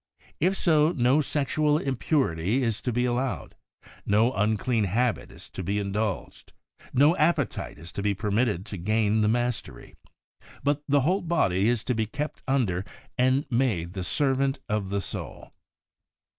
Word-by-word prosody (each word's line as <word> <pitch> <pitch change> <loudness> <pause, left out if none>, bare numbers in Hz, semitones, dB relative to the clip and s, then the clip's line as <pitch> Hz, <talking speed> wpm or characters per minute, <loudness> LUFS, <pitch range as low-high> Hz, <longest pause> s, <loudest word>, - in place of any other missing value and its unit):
If 185 +4 +2
so, 155 -1 +3
no 130 0 +3
sexual 150 +1 +1
impurity 130 - 0
is 115 -3 -1
to 125 - -1
be 125 +2 +1
allowed, 125 +1 -2 0.5
no 110 +5 +3
unclean 110 +1 +1
habit 115 +5 0
is - - -12
to - - -6
be 100 +3 -1
in 100 -1 -2
dulged, 105 -1 -3 0.4
no 145 +6 +4
appetite 155 - 0
is 85 +3 -10
to - - -4
be 100 0 0
permitted 105 -1 0
to 105 - -6
gain 110 +3 +1
the 105 - +3
mastery, 120 +1 -2 0.7
but 145 0 +1
the 145 -1 +3
whole 185 +9 +1
body 110 - +1
is 120 -3 0
to 125 - 0
be 110 -2 -1
kept 150 +7 -5
under 110 -10 +1 0.3
and 130 +3 +2
made 110 -9 0
the 95 -2 -4
servant 135 +4 +1
of 105 -3 -1
the 100 0 -1
soul. - - -7
120 Hz, 160 wpm, -26 LUFS, 105-140 Hz, 0.7 s, no